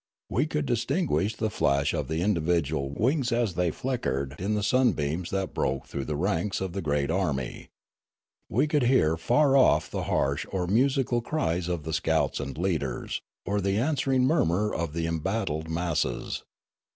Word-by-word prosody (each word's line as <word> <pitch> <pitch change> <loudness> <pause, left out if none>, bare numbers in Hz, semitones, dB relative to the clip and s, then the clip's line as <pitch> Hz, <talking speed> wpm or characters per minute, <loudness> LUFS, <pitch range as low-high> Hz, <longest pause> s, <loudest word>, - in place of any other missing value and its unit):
We 130 - +1
could 150 -1 -1
distinguish 120 - 0
the 110 -1 -1
flash 70 -3 +1
of 75 - -2
the 80 +3 -2
individual 80 -7 +1
wings 125 - 0
as 115 -5 +1
they 90 0 +1
flickered 70 - -2
in 100 +4 0
the 105 - -1
sunbeams 90 - +1
that 95 -1 -2
broke 65 0 -1
through 70 -1 -5
the 75 - -2
ranks 95 +3 0
of 95 -2 -3
the 100 - -3
great 75 -2 0
army. 75 -9 -2 0.8
We 130 +7 +2
could 150 -1 +1
hear 120 -11 +3
far 135 - +3
off 135 - +4
the - - -3
harsh 70 +1 0
or 95 -2 -1
musical 125 +4 +2
cries 90 - -1
of 85 -3 -2
the 80 +1 -4
scouts - - +1
and 70 -1 -5
leaders, 80 -8 -2 0.2
or 100 +1 0
the 100 +1 0
answering 135 0 +1
murmur 105 - +2
of 80 -2 -2
the 85 0 -1
embattled 80 -1 -2
masses. 85 0 -2
95 Hz, 165 wpm, -27 LUFS, 80-120 Hz, 0.8 s, off